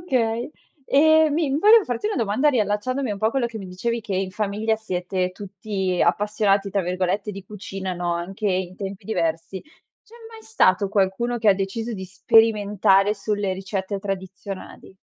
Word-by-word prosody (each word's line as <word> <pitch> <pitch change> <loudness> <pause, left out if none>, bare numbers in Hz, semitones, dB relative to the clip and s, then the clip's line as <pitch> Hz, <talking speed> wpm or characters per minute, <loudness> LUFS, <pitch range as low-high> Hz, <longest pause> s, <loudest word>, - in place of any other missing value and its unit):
Okay. 235 -3 0 0.4
E 315 +2 +5
mi 305 -1 0
volevo 425 +3 +6
farti 245 - -3
una 430 - -2
domanda 230 +5 +2
riallacciandomi 235 +2 0
un 200 - -3
po' 215 - +1
a - - +2
quello 260 -2 0
che 230 -1 -7
mi 195 - -8
dicevi 230 +6 -3
che 210 -3 -5
in 190 0 -2
famiglia 215 +2 -1
siete 185 -3 -2
tutti 190 -1 -3
"appassionati" 200 +1 +1
tra 200 - +1
virgolette 185 +3 -1
di 195 -1 -9
cucina, 195 -2 -6
no, 175 -1 -2
anche 190 +5 -4
in 185 -1 -2
tempi 195 0 -6
diversi. 165 -2 -2 0.4
C'è 445 - -20 0.2
mai 445 -1 -12
stato 200 - +2
qualcuno 200 +5 0
che 225 -2 +1
ha - - +8
deciso 200 +5 -3
di 190 -3 -5
sperimentare 205 0 +3
sulle 205 -1 -2
ricette 190 +1 -4
tradizionali? 190 -1 -7
200 Hz, 165 wpm, -23 LUFS, 190-225 Hz, 0.4 s, ha